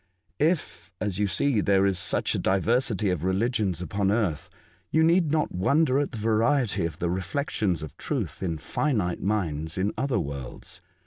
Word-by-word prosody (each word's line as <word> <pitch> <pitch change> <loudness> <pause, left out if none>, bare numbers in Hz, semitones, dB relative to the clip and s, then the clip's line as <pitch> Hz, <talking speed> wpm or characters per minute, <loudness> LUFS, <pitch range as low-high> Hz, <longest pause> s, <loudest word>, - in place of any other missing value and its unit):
If, 120 - -1
as 100 -3 -2
you 105 - +2
see, 110 +5 +1
there 100 -1 +3
is 95 -2 +2
such - - +2
a - - -1
diversity 105 +1 +1
of 85 -3 -2
religions 95 - 0
upon 100 +1 -1
earth, 95 -6 0 0.4
you 160 - +3
need 165 -1 +3
not 155 -1 +1
wonder 140 - +2
at 145 - -1
the 120 - -7
variety 110 -3 +1
of 80 - -9
the 85 - -1
reflections 95 - -1
of 80 - -8
truth - - -3
in 85 -4 -2
finite 90 - -1
minds 80 -6 -2
in 95 +3 0
other 135 -2 0
worlds. 70 -2 -6
100 Hz, 170 wpm, -26 LUFS, 90-125 Hz, 0.4 s, there